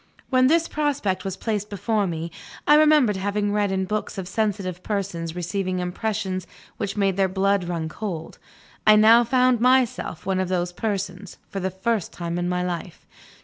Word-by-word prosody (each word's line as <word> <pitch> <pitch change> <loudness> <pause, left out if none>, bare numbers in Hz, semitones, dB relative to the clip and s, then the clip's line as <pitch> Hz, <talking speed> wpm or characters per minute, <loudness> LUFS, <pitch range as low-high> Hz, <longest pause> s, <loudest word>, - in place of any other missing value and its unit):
When 255 0 +5
this 330 +3 +3
prospect 285 -11 -1
was 195 -1 -4
placed 210 -1 -2
before 205 +1 0
me, 165 0 -4 0.4
I 295 - +7
remembered 300 -8 +5
having 205 +1 -1
read 205 -1 +1
in 190 0 0
books 210 +1 -3
of 190 -2 -4
sensitive 195 -3 -2
persons 180 -5 -3
receiving 185 +1 -2
impressions 185 +1 -2 0.3
which 200 -1 -3
made 195 -2 +1
their 195 -1 +3
blood 195 0 +1
run 170 -2 -3
cold; 165 -2 -6 0.5
I 215 - +9
now 225 +3 +7
found 250 0 +3
myself 250 -7 +2
one 190 -1 0
of 185 -1 -1
those 180 -1 -1
persons, 200 -2 -4
for 195 - -3
the 190 0 -1
first 195 +2 -2
time 170 0 -4
in 175 0 -1
my 180 0 0
life. 175 -1 -5
195 Hz, 175 wpm, -24 LUFS, 180-220 Hz, 0.5 s, I